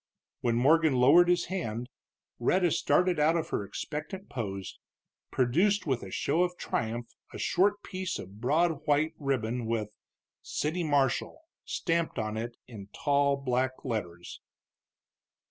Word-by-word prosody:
When 120 -1 0
Morgan 155 +4 +4
lowered 145 +8 +6
his 175 -1 +3
hand 125 - -3 0.5
Rhetta 175 +8 +2
started 175 +4 +2
out 160 +3 +4
of 160 - -3
her - - -1
expectant 155 - -6
pose, 100 -5 -5 0.5
producing 175 +11 +2
with 130 -4 0
a 95 - -8
show 145 - 0
of 180 0 0
triumph 115 +1 -3 0.2
a - - -8
short 205 +2 +1
piece 185 -1 -4
of 100 +4 -10
broad 155 +4 +1
white 150 +2 +2
ribbon, 125 -4 -1
with 110 -2 -1 0.5
CITY 165 +3 -2
MARSHAL 145 - 0 0.2
stamped 165 -3 -1
on 110 -1 -2
it 115 +2 -5
in 105 -5 -10
tall 140 -1 +2
black 130 0 -1
letters. 90 -8 -5
140 Hz, 135 wpm, -29 LUFS, 115-170 Hz, 0.5 s, lowered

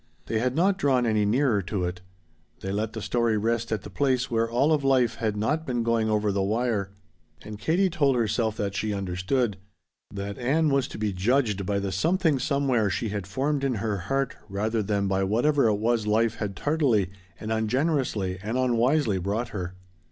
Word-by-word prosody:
They 110 - -1
had 125 +2 0
not 190 +4 +2
drawn 130 -7 +2
any 110 -2 +2
nearer 115 -1 +2
to 95 0 -3
it. 90 0 -3 0.6
They 95 - -4
let 105 +2 -2
the 110 -3 -5
story 115 -2 +1
rest 115 +2 -1
at 105 -3 -1
the - - -8
place 130 0 0
where 115 0 +1
all 130 +6 +2
of 150 -2 +1
life 130 -4 +2
had 110 -2 -1
not 150 +10 0
been 120 -6 -1
going 115 -1 +1
over 105 -1 +1
the 100 0 0
wire. 105 -1 0 0.5
And 105 -1 -8
Katie 175 - +2
told 150 -7 +2
herself 110 -1 0
that 100 -1 -2
she 105 +1 -2
understood. 100 +4 -1 0.5
That 100 0 -5
Ann 150 +6 +2
was 135 -2 +1
to - - -9
be 105 -2 -1
judged 105 0 +1
by 100 - 0
the 100 -1 -2
Something 160 - +1
Somewhere 130 -6 +1
she 110 +3 -2
had 100 -2 -4
formed 135 +7 -1
in 135 -3 +1
her 105 -1 -2
heart 135 -1 0
rather 110 +3 -1
than 100 -1 0
by 95 0 +1
whatever 120 +7 +2
it 105 - +3
was 110 +1 0
life 110 +1 +2
had 100 -3 -4
tardily 120 - +1 0.3
and 110 - -5
ungenerously 110 - 0
and 110 +4 -2
unwisely 125 -2 +2
brought 105 +6 -2
her. 90 -2 -5
115 Hz, 195 wpm, -26 LUFS, 100-130 Hz, 0.6 s, it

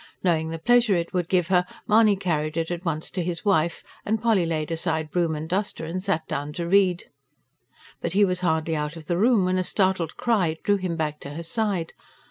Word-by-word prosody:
Knowing 160 -3 +1
the 165 - -4
pleasure 240 +2 +3
it 170 -1 -2
would 180 -2 -1
give 180 -3 +1
her, 180 -1 +4 0.2
Mahony 215 -1 +5
carried 160 -4 -2
it 165 +1 -1
at 175 0 -4
once 160 -3 -2
to 180 - -2
his 170 +1 -4
wife; 170 -4 +1 0.2
and 220 +1 0
Polly 210 -7 +2
laid 155 -1 -2
aside 160 -2 -1
broom 170 -3 +1
and 155 +1 -5
duster 190 -2 -2
and 175 +3 -4
sat 190 -4 -1
down 145 0 -3
to 170 +1 -4
read. 185 -1 +3 1.0
But 170 - -3
he 205 +1 +5
was 180 -1 -1
hardly 160 -2 0
out 150 +1 -3
of 160 -2 -10
the 175 +3 -1
room 220 -3 +4
when 185 0 +1
a - - +1
startled 185 -4 0
cry 185 -9 +1
drew 205 0 +3
him 185 -3 -3
back 150 -2 -2
to 140 +1 -8
her 170 - -5
side. 195 -2 -1
175 Hz, 220 wpm, -25 LUFS, 160-190 Hz, 1.0 s, Mahony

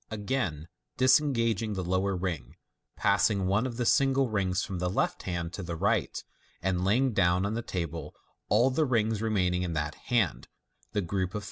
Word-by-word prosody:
Again 100 - -2 0.3
disengaging 115 -5 +3
the 95 -2 -3
lower 95 +2 0
ring, 85 -9 -4 0.4
passing 100 -3 +2
one 100 +7 +1
of 120 -2 -6
the 120 - -1
single 135 -1 +3
rings 95 -2 0
from 95 -4 -4
the 90 0 0
left 90 - -1
hand 85 -1 -3
to 95 - -5
the 85 -2 -4
right, - - 0 0.4
and 90 0 -1
laying 120 +6 +2
down 90 -1 +2
on 100 - -1
the 115 - -2
table 85 -6 -5 0.3
all 120 +5 +4
the 155 +4 +2
rings 110 -4 +1
remaining 95 -5 +1
in 90 -2 -2
that 75 -1 -2
hand 115 -9 -1 0.5
(the 105 - +1
group 95 +1 -1
of - - -22
three - - -2
Fig. - - -2
100 Hz, 190 wpm, -29 LUFS, 90-115 Hz, 0.5 s, all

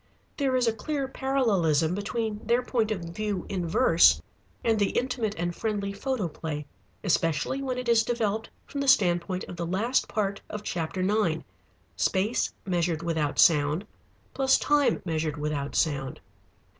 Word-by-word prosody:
There 270 -3 +1
is 250 -1 +2
a 230 - +2
clear 275 +4 -3
parallelism 200 - +1
between 210 +2 -3
their 240 +2 +2
point 230 -3 0
of 210 -4 -2
view 185 +3 -3
in 180 -3 -2
verse 165 +1 +5 0.4
and 225 -2 +2
the 200 - +2
Intimate 245 -4 -1
and 175 0 -2
friendly 205 -3 -2
Photoplay, 170 - -3 0.4
especially 170 - +1
when 260 -2 -2
it 250 -1 -4
is 230 -1 +5
developed 220 -2 -1 0.2
from 280 - -4
the 275 - -2
standpoint 180 -4 +3
of 175 - -8
the 170 - -2
last 220 +9 +1
part 200 -2 -2
of 210 0 -6
chapter 175 0 -2
nine, 190 -5 +1 0.5
space 205 +5 +1
measured 170 -3 0
without 160 -3 -1
sound 150 +3 +4 0.5
plus 265 -1 +4
time 295 -1 +2
measured 160 -2 -1
without 150 -1 -3
sound. 140 -5 0
200 Hz, 150 wpm, -27 LUFS, 170-235 Hz, 0.5 s, verse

